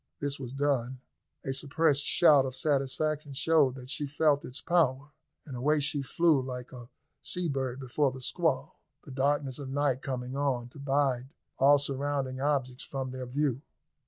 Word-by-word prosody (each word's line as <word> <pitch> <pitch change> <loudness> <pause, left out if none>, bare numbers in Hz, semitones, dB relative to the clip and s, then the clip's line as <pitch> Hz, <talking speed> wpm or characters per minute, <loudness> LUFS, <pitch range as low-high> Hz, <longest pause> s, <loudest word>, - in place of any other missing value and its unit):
This 145 0 -2
was 125 -3 -6
done. 130 -2 -1 0.5
A 135 - -1
suppressed 145 +1 +1
shout 150 -5 +6
of 130 - -6
satisfaction 145 +1 -1
showed 145 -2 +3
that 130 0 -8
she 145 +1 -2
felt 150 0 +2
its 125 - -6
power, 145 -4 +1 0.3
and 135 - -7
away 150 +5 +2
she 145 0 +1
flew 155 +1 +2
like 125 -1 -6
a 120 -2 -10 0.3
sea 180 -1 -2
bird 135 -3 -2
before 135 +2 0
the 130 - -9
squall, 125 - -1 0.2
the - - -11
darkness 135 0 0
of 140 -2 -6
night 135 -2 0
coming 130 -1 -4
on 130 -4 -1
to 140 - -14
bide 135 -2 0 0.3
all 140 +2 +7
surrounding 140 -1 -2
objects 135 -3 -1
from 135 -2 -4
their 130 -1 -6
view. 135 0 -1
135 Hz, 165 wpm, -29 LUFS, 130-145 Hz, 0.5 s, all